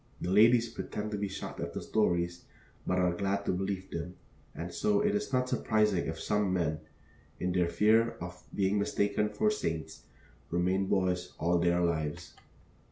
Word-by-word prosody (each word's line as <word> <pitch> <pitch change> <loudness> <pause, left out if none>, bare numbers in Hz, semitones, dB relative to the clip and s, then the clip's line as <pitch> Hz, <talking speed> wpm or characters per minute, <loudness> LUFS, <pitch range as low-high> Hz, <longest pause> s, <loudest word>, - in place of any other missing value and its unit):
The 90 - -2
ladies 115 +4 +6
pretend 105 -2 -5
to 105 - -2
be 100 - -1
shocked 95 - -7
at - - -4
the - - -4
stories, 85 -5 0 0.4
but 90 - +1
are 90 -1 +2
glad 100 +2 -1
to - - +1
believe 95 +1 -3
them; 85 +2 -5 0.4
and 85 +1 -6
so 210 -1 +2
it 210 0 +2
is 210 -5 -2
not 125 -1 +1
surprising 105 -6 +1
if 80 0 -4
some 105 -2 0
men, 80 -4 0 0.6
in 90 - -1
their 90 -1 +2
fear 110 +4 +3
of 90 0 -7
being 100 +1 +2
mistaken 100 +1 +1
for 215 - +1
saints, 80 - -3 0.5
remain 90 +3 +1
boys 90 -2 0
all 85 +1 +2
their 85 0 +2
lives. 80 -3 -2
95 Hz, 170 wpm, -31 LUFS, 85-105 Hz, 0.6 s, ladies